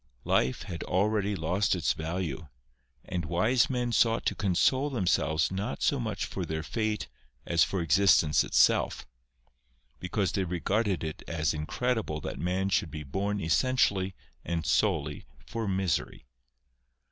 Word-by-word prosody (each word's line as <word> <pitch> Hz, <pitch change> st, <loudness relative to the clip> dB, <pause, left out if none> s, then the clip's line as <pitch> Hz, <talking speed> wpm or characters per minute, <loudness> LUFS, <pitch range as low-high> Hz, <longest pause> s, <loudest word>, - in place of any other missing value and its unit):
Life 65 Hz, +1 st, +1 dB
had 85 Hz, -, -6 dB
already 100 Hz, +1 st, +1 dB
lost 90 Hz, +5 st, +1 dB
its 85 Hz, -6 st, +1 dB
value, 80 Hz, -2 st, -4 dB, 0.6 s
and 90 Hz, -2 st, -3 dB
wise 110 Hz, -, +2 dB
men 125 Hz, -2 st, -1 dB
sought 115 Hz, 0 st, +2 dB
to -, -, +1 dB
console 100 Hz, +9 st, +2 dB
themselves 85 Hz, -, +1 dB
not 95 Hz, -7 st, -3 dB
so -, -, +2 dB
much -, -, -2 dB
for -, -, -5 dB
their 80 Hz, 0 st, -3 dB
fate 110 Hz, +3 st, -2 dB, 0.4 s
as 85 Hz, -1 st, +3 dB
for 95 Hz, -, -1 dB
existence 80 Hz, -3 st, +4 dB
itself; -, -, +2 dB, 0.9 s
because 90 Hz, +2 st, -1 dB
they 95 Hz, -, 0 dB
regarded 95 Hz, +3 st, -1 dB
it 80 Hz, -1 st, -5 dB
as 80 Hz, -1 st, 0 dB
incredible 90 Hz, +2 st, -2 dB
that -, -, -5 dB
man 90 Hz, +4 st, 0 dB
should 95 Hz, -2 st, +1 dB
be 75 Hz, +1 st, -6 dB
born 100 Hz, +9 st, -2 dB
essentially 95 Hz, -, +1 dB, 0.3 s
and 85 Hz, -2 st, -3 dB
solely 80 Hz, -4 st, 0 dB, 0.2 s
for 115 Hz, -2 st, -4 dB
misery. 95 Hz, -3 st, -1 dB
95 Hz, 135 wpm, -29 LUFS, 80-105 Hz, 0.9 s, existence